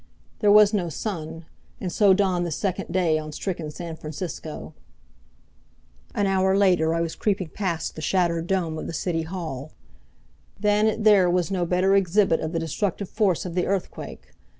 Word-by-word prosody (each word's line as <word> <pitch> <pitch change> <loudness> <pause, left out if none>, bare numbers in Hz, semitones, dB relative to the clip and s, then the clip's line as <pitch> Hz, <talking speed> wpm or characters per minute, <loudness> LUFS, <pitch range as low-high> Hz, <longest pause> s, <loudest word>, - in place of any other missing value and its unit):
There 205 -2 +4
was 210 0 +7
no 180 -5 0
sun. 165 -2 -5 0.3
And 185 - -3
so 200 +2 +4
dawned 190 -2 +2
the 170 - -3
second 185 +3 -2
day 170 -4 +2
on 155 0 -7
stricken 165 0 -4
San 165 +2 -7
Francisco. 155 0 -7 1.4
An 205 - +1
hour 190 0 +2
later 180 -5 +3
I 165 - 0
was 165 -1 -2
creeping 195 -5 -1
past 175 -3 -3
the 155 - -7
shattered 170 0 0
dome 170 -4 -1
of - - -6
the - - -5
City 165 0 -1
Hall. 160 -5 -6 0.9
Than 210 +1 +3
it 220 0 -1
there 200 -4 +6
was 180 +1 0
no 180 -3 0
better 185 +3 +3
exhibit 195 -2 +3
of 155 - -3
the 170 - -2
destructive 180 +4 -2
force 200 -6 +1
of 175 - -5
the 180 0 0
earthquake. 195 -1 -4
180 Hz, 175 wpm, -24 LUFS, 165-195 Hz, 1.4 s, was